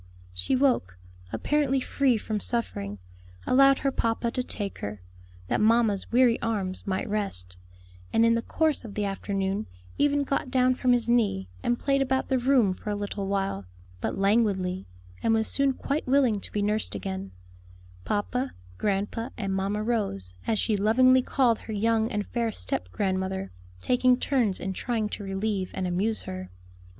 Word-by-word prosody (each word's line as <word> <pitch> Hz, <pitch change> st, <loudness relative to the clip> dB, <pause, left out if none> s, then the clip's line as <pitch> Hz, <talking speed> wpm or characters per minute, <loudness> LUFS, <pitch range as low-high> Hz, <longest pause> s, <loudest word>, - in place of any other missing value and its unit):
She 90 Hz, -, 0 dB
woke, 250 Hz, -, +1 dB, 0.3 s
apparently 285 Hz, -3 st, +1 dB
free 260 Hz, -2 st, +2 dB
from 215 Hz, 0 st, -3 dB
suffering, 105 Hz, -, -1 dB, 0.5 s
allowed 275 Hz, +1 st, +6 dB
her 275 Hz, -, +3 dB
papa 230 Hz, -1 st, 0 dB
to 255 Hz, -, -1 dB
take 205 Hz, -5 st, -4 dB
her, 100 Hz, 0 st, -5 dB, 0.5 s
that -, -, 0 dB
mamma's 220 Hz, -2 st, +3 dB
weary 245 Hz, -1 st, +4 dB
arms 200 Hz, -5 st, -2 dB
might 190 Hz, -1 st, -1 dB
rest, 90 Hz, -, -2 dB, 0.6 s
and 225 Hz, -, +4 dB
in 230 Hz, -, +5 dB
the 230 Hz, -, +1 dB
course 315 Hz, +3 st, 0 dB
of 215 Hz, -4 st, -9 dB
the 210 Hz, -, 0 dB
afternoon 195 Hz, -, -2 dB, 0.3 s
even 285 Hz, 0 st, +3 dB
got 275 Hz, -1 st, -1 dB
down 255 Hz, 0 st, +3 dB
from 255 Hz, 0 st, +1 dB
his 240 Hz, -1 st, +1 dB
knee, 210 Hz, -, +1 dB
and 240 Hz, -, +1 dB
played 275 Hz, -1 st, +1 dB
about 265 Hz, 0 st, 0 dB
the 260 Hz, -1 st, +2 dB
room 245 Hz, -6 st, +3 dB
for 210 Hz, -, -7 dB
a 205 Hz, -, 0 dB
little 205 Hz, -1 st, -4 dB
while, 195 Hz, -, -1 dB, 0.3 s
but -, -, -2 dB
languidly, 195 Hz, -3 st, +1 dB, 0.3 s
and 225 Hz, -, +3 dB
was 220 Hz, 0 st, +1 dB
soon 275 Hz, -1 st, +2 dB
quite 280 Hz, +3 st, -3 dB
willing 255 Hz, -6 st, +3 dB
to -, -, -4 dB
be 205 Hz, -, -1 dB
nursed 210 Hz, -, -1 dB
again, 95 Hz, 0 st, -4 dB, 0.7 s
"papa, 250 Hz, -, -2 dB, 0.2 s
grandpa, 210 Hz, +4 st, -1 dB
and 195 Hz, -3 st, -2 dB
Mamma 200 Hz, +2 st, -1 dB
Rose," 200 Hz, -, -2 dB
as 220 Hz, -, +2 dB
she 215 Hz, +1 st, +2 dB
lovingly 255 Hz, +6 st, +5 dB
called 245 Hz, -3 st, +2 dB
her 220 Hz, -, -7 dB
young 225 Hz, +2 st, +1 dB
and 210 Hz, -2 st, -1 dB
fair 235 Hz, -2 st, -1 dB
step 90 Hz, -, -4 dB
grandmother, 190 Hz, -, -2 dB, 0.3 s
taking 250 Hz, -, +3 dB
turns 245 Hz, -9 st, +1 dB
in 190 Hz, 0 st, -3 dB
trying 220 Hz, +1 st, -1 dB
to 205 Hz, -, -6 dB
relieve 195 Hz, -1 st, -2 dB
and 185 Hz, -, -2 dB
amuse 195 Hz, +5 st, 0 dB
her. 95 Hz, 0 st, -6 dB
215 Hz, 165 wpm, -27 LUFS, 195-250 Hz, 0.7 s, allowed